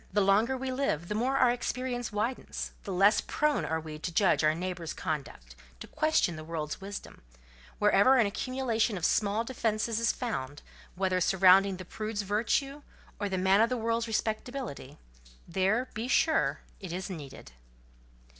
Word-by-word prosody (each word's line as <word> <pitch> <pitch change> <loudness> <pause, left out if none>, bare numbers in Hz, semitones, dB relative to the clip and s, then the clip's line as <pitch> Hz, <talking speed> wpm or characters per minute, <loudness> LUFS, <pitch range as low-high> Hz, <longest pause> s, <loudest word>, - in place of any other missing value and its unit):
The 210 - +2
longer 210 +7 +3
we 260 0 -3
live, 255 - -1
the - - -1
more 250 +5 0
our 250 -2 +5
experience 245 -1 -3
widens; 220 +5 -3
the 200 - -4
less 195 +4 +4
prone 300 -1 0
are 160 0 -1
we 155 -1 -8
to 170 - -4
judge 180 -1 +3
our 155 0 +3
neighbour's 175 -1 -4
conduct, 135 - -5 0.2
to - - -7
question 310 - +1
the 155 - -7
world's 155 0 -5
wisdom: 200 +1 -8 0.6
wherever 210 +5 +5
an 235 - +4
accumulation 230 0 -1
of 170 - -2
small 210 +2 +1
defences 225 -2 -1
is 230 -1 +2
found, 145 - -5 0.3
whether 185 -1 0
surrounding 190 +1 +5
the 185 - -8
prude's 215 +2 -4
virtue 235 +8 -1 0.4
or 205 -1 -2
the 190 - -1
man 190 +3 +4
of 230 - +3
the 255 - -1
world's 230 0 -1
respectability, 220 - -4 0.5
there, 195 +8 +1
be 225 +3 -4
sure, 315 +4 +2 0.2
it 190 -4 -7
is 185 +2 -4
needed. 150 - -9
205 Hz, 165 wpm, -29 LUFS, 180-240 Hz, 0.6 s, our